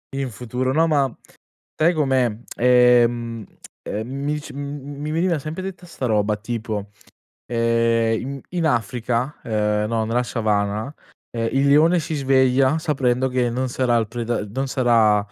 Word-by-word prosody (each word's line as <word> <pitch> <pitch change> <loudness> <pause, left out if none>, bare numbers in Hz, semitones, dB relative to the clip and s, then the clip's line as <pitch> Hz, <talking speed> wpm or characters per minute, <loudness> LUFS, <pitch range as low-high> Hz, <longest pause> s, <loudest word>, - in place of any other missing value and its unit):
In 135 -2 -2
futuro 125 +3 -3
no, 165 +3 +3
ma 140 -5 +1 0.7
sai 170 +3 +4
com'è? 135 -5 +2 0.3
Ehm, 120 -2 +3 0.4
ehm, 110 +2 -4 0.2
mi 150 +1 -1
c - - -10
m 140 - -10 0.4
m - - -7
mi 150 - -3
veniva 165 0 +1
sempre 155 +5 -6
detta 185 -2 -7
'sta 135 -7 -4
roba 105 -1 +1
tipo, 110 -2 -4 0.6
ehm, 115 +2 +1
i 180 - -8
in 170 - 0
Africa, 120 +1 -1
uhm, 105 -1 0
no, 110 0 -1
nella 120 +2 +1
Savana, 110 +2 -1 0.4
ehm, 115 -1 -2
il 135 +1 +2
leone 160 +5 +5
si 160 0 -3
sveglia 135 +1 +3
sapendo 130 -4 0
che 125 -1 0
non 130 +2 -2
sarà 120 -1 +1
il 110 - -1
preda 120 -2 -3
non 135 +6 -3
sarà, 115 -5 +3
125 Hz, 155 wpm, -22 LUFS, 115-140 Hz, 0.7 s, leone